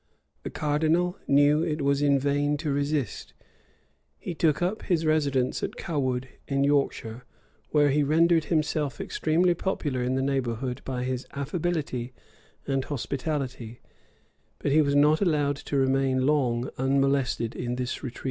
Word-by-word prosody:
The -, -, -5 dB
cardinal 160 Hz, +5 st, 0 dB
knew 145 Hz, +2 st, +4 dB
it 155 Hz, -3 st, -1 dB
was 140 Hz, 0 st, +2 dB
in 140 Hz, -1 st, +4 dB
vain 145 Hz, +1 st, +1 dB
to 150 Hz, -1 st, -2 dB
resist: 145 Hz, -3 st, -2 dB, 0.8 s
he 180 Hz, -, -5 dB
took 155 Hz, -2 st, +1 dB
up 185 Hz, +5 st, -1 dB
his 165 Hz, -4 st, 0 dB
residence 140 Hz, -5 st, +1 dB
at -, -, -3 dB
Cawood, 130 Hz, -5 st, -2 dB, 0.2 s
in 140 Hz, 0 st, +1 dB
Yorkshire, 135 Hz, -5 st, 0 dB, 0.5 s
where 145 Hz, -2 st, +3 dB
he 150 Hz, +2 st, +2 dB
rendered 160 Hz, +2 st, +3 dB
himself 155 Hz, -4 st, -1 dB
extremely 170 Hz, +3 st, +1 dB
popular 150 Hz, -7 st, -2 dB
in 125 Hz, +1 st, 0 dB
the 130 Hz, -, 0 dB
neighborhood 130 Hz, -2 st, -2 dB
by 125 Hz, -2 st, -3 dB
his 130 Hz, 0 st, -3 dB
affability 140 Hz, -4 st, -3 dB, 0.5 s
and 135 Hz, -1 st, 0 dB
hospitality;[] 130 Hz, -4 st, -4 dB, 0.8 s
but 140 Hz, -, -2 dB
he 155 Hz, +2 st, +5 dB
was 140 Hz, -1 st, +1 dB
not 150 Hz, +3 st, +4 dB
allowed 145 Hz, -6 st, +1 dB
to 145 Hz, -, -3 dB
remain 135 Hz, -1 st, +2 dB
long 130 Hz, -4 st, +1 dB
unmolested 135 Hz, -3 st, +1 dB
in 120 Hz, 0 st, -3 dB
this 125 Hz, 0 st, -3 dB
retreat. 130 Hz, -4 st, -7 dB
140 Hz, 145 wpm, -26 LUFS, 130-155 Hz, 0.8 s, he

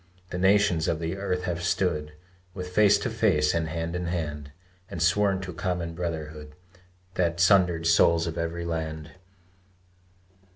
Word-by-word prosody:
The 90 Hz, -, -3 dB
nations 95 Hz, -3 st, +3 dB
of 80 Hz, -, 0 dB
the 85 Hz, +2 st, -3 dB
earth 90 Hz, -2 st, -2 dB
have 85 Hz, -1 st, -3 dB
stood 85 Hz, -4 st, -1 dB, 0.4 s
With 90 Hz, -1 st, -5 dB
face 105 Hz, +2 st, +5 dB
to -, -, -1 dB
face 75 Hz, 0 st, +2 dB
and 85 Hz, -1 st, 0 dB
hand 80 Hz, +2 st, -4 dB
in 90 Hz, -1 st, -3 dB
hand, 75 Hz, -4 st, -4 dB, 0.4 s
And 85 Hz, -, -6 dB
sworn 95 Hz, +3 st, +2 dB
to 90 Hz, -1 st, -6 dB
common 85 Hz, -1 st, -3 dB
brotherhood 80 Hz, -3 st, -5 dB, 0.6 s
The 85 Hz, -2 st, 0 dB
sundered 90 Hz, -2 st, +3 dB
souls 85 Hz, 0 st, +4 dB
of 80 Hz, -1 st, -4 dB
every 85 Hz, 0 st, -3 dB
land. 80 Hz, -2 st, -4 dB
85 Hz, 150 wpm, -26 LUFS, 80-90 Hz, 0.6 s, face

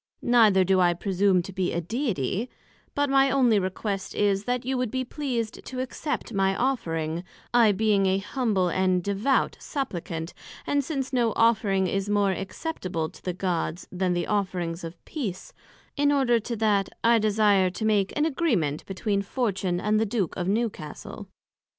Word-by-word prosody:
Neither 220 Hz, -6 st, +5 dB
do 190 Hz, +1 st, +3 dB
I 175 Hz, -1 st, +4 dB
presume 190 Hz, 0 st, +2 dB
to 195 Hz, -, -9 dB
be 185 Hz, -1 st, -1 dB
a 170 Hz, -, -1 dB
Deity; 215 Hz, -, -2 dB, 0.5 s
but 285 Hz, 0 st, +2 dB
my 270 Hz, 0 st, +4 dB
onely 250 Hz, -6 st, +4 dB
request 195 Hz, +1 st, -3 dB
is, 200 Hz, -1 st, +1 dB
that 245 Hz, 0 st, -1 dB
you 265 Hz, +1 st, -1 dB
would 250 Hz, -2 st, -1 dB
be 260 Hz, +3 st, -2 dB
pleased 245 Hz, -5 st, -3 dB
to 255 Hz, -, -6 dB
accept 260 Hz, +2 st, -3 dB
of 205 Hz, -, -4 dB
my 195 Hz, 0 st, +2 dB
Offering, 170 Hz, -11 st, -1 dB, 0.3 s
I 235 Hz, -3 st, +6 dB
being 205 Hz, -1 st, +2 dB
an 190 Hz, +1 st, +2 dB
humble 205 Hz, -3 st, 0 dB
and 185 Hz, 0 st, +1 dB
devout 200 Hz, +8 st, +1 dB
supplicant; 175 Hz, -, -4 dB, 0.3 s
and 285 Hz, 0 st, +1 dB
since 270 Hz, -2 st, -3 dB
no 235 Hz, -4 st, +2 dB
offering 210 Hz, -4 st, +3 dB
is 195 Hz, +2 st, -1 dB
more 205 Hz, -1 st, +2 dB
acceptable 185 Hz, -, -4 dB
to -, -, -17 dB
the 180 Hz, -, -3 dB
Gods, 180 Hz, -2 st, -2 dB
then 180 Hz, 0 st, 0 dB
the 175 Hz, -1 st, -1 dB
offering 185 Hz, -5 st, -1 dB
of 165 Hz, +1 st, -7 dB
Peace; 210 Hz, -, -5 dB, 0.4 s
in 290 Hz, 0 st, +3 dB
order 260 Hz, -5 st, +3 dB
to 235 Hz, +2 st, -4 dB
that, 205 Hz, -3 st, +1 dB
I 230 Hz, 0 st, +5 dB
desire 205 Hz, -3 st, +3 dB
to 220 Hz, +4 st, -4 dB
make 205 Hz, -3 st, +2 dB
an 300 Hz, -, +3 dB
agreement 230 Hz, -, 0 dB
between 200 Hz, +1 st, -1 dB
Fortune, 195 Hz, -5 st, -1 dB
and 215 Hz, +2 st, +1 dB
the 220 Hz, -, +1 dB
Duke 200 Hz, -5 st, -1 dB
of 175 Hz, -1 st, -3 dB
Newcastle. 200 Hz, -7 st, -3 dB
205 Hz, 170 wpm, -26 LUFS, 185-240 Hz, 0.5 s, I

